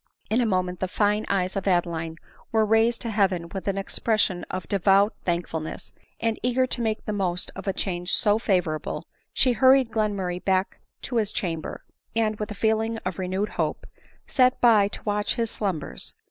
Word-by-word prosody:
In 230 +3 +3
a 235 - +2
moment 180 -3 0
the 185 - -1
fine 210 +3 +1
eyes 185 -1 0
of 195 0 -2
Adeline 170 -3 0 0.3
were 220 -1 +3
raised 225 +2 +3
to 230 - -3
heaven 190 -5 +1
with 190 +2 -6
an 195 -1 0
expression 195 -2 0
of 185 -2 -4
devout 200 +1 +3
thankfulness; 170 -2 -3 0.3
and 225 -1 -1
eager 250 +1 +2
to 255 -1 -3
make 220 -1 -1
the 210 - -2
most 180 -3 0
of - - -8
a - - +3
change 180 -2 -3
so 210 +1 +3
favorable, 180 -8 -1 0.3
she 255 - +3
hurried 260 0 +5
Glenmurray 200 -5 -1
back 190 0 0 0.2
to 245 - -2
his 215 -2 +1
chamber, 165 -4 -3 0.3
and, 215 -2 +1
with 210 - -3
a 210 - -6
feeling 220 +2 +1
of 185 0 -3
renewed 190 +3 -1
hope, - - -2 0.4
sat 255 -1 +3
by 220 -4 +6
to - - -7
watch 205 0 0
his 230 -2 -1
slumbers. 185 -8 -4
200 Hz, 180 wpm, -25 LUFS, 180-220 Hz, 0.4 s, by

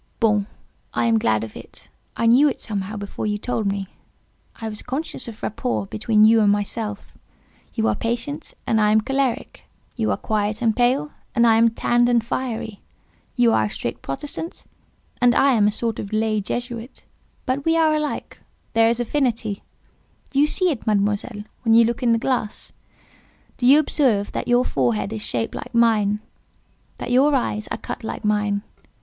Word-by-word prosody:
"Bon! 210 -3 +2 0.5
I - - +1
am 230 -1 +3
glad 110 - +1
of 110 - -8
it. - - -12 0.3
I 230 - 0
knew 255 +6 +6
it, 265 - -5
somehow; 205 -1 -4
before 200 +1 -5
you 210 0 0
told 220 -1 -2
me. 195 -1 -2 0.7
I 225 - -6
was 210 -1 -5
conscious 270 -1 -4
of 225 -2 -10
rapport 220 0 -2
between 215 +1 +3
you 225 +1 +6
and 205 -1 +4
myself. 205 +1 -3 0.6
You 220 -1 +1
are - - +3
patient, 245 +6 -4
and 220 -1 +2
I 210 0 +4
am 215 0 +4
choleric; 270 +1 -2 0.3
you 110 - 0
are 100 - +1
quiet 210 0 -1
and 225 -3 +1
pale, 265 +5 +1 0.2
and 235 -1 +4
I 225 -1 +5
am 230 +1 +5
tanned 240 +1 +2
and 235 -2 +3
fiery; 230 -4 -4 0.5
you 240 -2 +4
are 110 - +3
a - - -3
strict 115 - -5
Protestant, 295 - -5 0.6
and 245 0 +5
I 275 - +5
am 210 -3 +4
a - - +2
sort 225 +1 -3
of 200 - -6
lay 215 -1 +1
Jesuit: 240 +3 -5 0.4
but 260 +2 -1
we 325 +1 +2
are 320 -1 +4
alike—there 270 -6 -2
is 235 +1 0
affinity 240 -3 0
between 200 - -8
us. - - -39
Do 275 - 0
you 295 - +5
see 365 +3 +2
it, 250 -7 -6
Mademoiselle, 205 +1 0 0.2
when 225 -2 +3
you 230 0 +7
look 235 +3 -2
in 240 -2 +3
the 230 - +4
glass? 230 -3 -2 0.9
Do 245 - +1
you 275 +3 +8
observe 255 -9 +2
that - - -4
your 245 +1 +3
forehead 115 -7 0
is 110 - -4
shaped 115 +1 -2
like - - -7
mine—that 220 +1 -2
your 275 +4 +4
eyes 215 -4 -1
are - - -4
cut - - -7
like 220 - -5
mine? 210 -1 +1
225 Hz, 185 wpm, -22 LUFS, 210-245 Hz, 0.9 s, you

